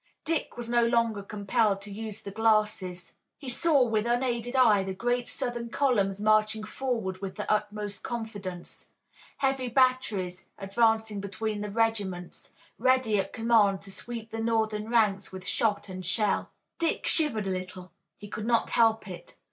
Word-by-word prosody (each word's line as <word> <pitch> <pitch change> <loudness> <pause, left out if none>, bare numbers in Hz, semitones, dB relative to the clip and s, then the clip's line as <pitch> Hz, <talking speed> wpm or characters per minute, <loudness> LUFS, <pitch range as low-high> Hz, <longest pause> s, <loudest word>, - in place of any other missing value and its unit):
Dick 325 -5 -2
was 240 -1 -5
no 240 0 +3
longer 230 -3 +1
compelled 205 +1 0
to 205 - -9
use 215 0 -6
the 200 - -6
glasses. 210 -5 0 0.2
He 280 - -11
saw 290 +1 +3
with 225 -2 0
unaided 240 0 0
eye 220 -6 +5
the 190 0 -4
great 245 +4 0
Southern 240 -1 -4
columns 205 -8 +1
marching 215 +1 +2
forward 215 -6 -3
with 195 -1 -5
the 210 - -5
utmost 210 -1 -3
confidence, 205 -7 -6 0.5
heavy 270 -2 0
batteries 235 -8 +1
advancing 220 +1 +1
between 205 +2 -3
the 210 - -4
regiments, 200 -5 -2 0.3
ready 255 -5 +3
at 195 - -2
command 225 -4 +3
to 195 - -10
sweep 230 +2 -7
the 225 - -4
Northern 220 -1 0
ranks 210 -4 +2
with 185 -1 -8
shot 210 0 0
and 185 -1 -7
shell. 205 +3 0 0.3
Dick 330 -1 0
shivered 280 - +3
a 190 - -1
little. 185 -1 -6 0.3
He 205 - -10
could 210 +1 -5
not 235 -1 +2
help 225 -1 +3
it. - - -10
220 Hz, 155 wpm, -28 LUFS, 200-235 Hz, 0.5 s, eye